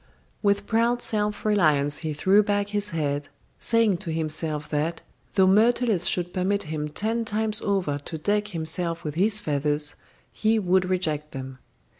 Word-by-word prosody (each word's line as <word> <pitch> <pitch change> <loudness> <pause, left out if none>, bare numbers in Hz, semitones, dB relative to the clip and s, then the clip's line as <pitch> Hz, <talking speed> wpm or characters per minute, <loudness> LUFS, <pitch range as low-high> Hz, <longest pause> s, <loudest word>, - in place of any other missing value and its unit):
With 200 -1 +1
proud 235 +2 +1
self 210 -1 0
reliance 150 -9 +2
he 160 -2 -3
threw 190 +7 +4
back 205 0 0
his 205 0 -1
head, 145 -4 -2 0.3
saying 230 -5 +3
to 170 -2 -5
himself 155 -1 -2
that, 160 +3 -2 0.3
though 190 - +5
Myrtilus 215 -1 +3
should 175 -1 -2
permit 195 +2 0
him 150 -1 -4
ten 220 +9 -1
times 215 0 -1
over 185 -8 0
to 160 +3 -7
deck 205 +6 0
him 160 -1 -2
self 165 +1 -1
with 150 - -4
his 200 +6 +2
feathers, 145 -1 -1 0.4
he 220 +1 +2
would 185 -2 +2
reject 155 -5 -1
them. 130 -1 -7
185 Hz, 160 wpm, -25 LUFS, 155-210 Hz, 0.4 s, though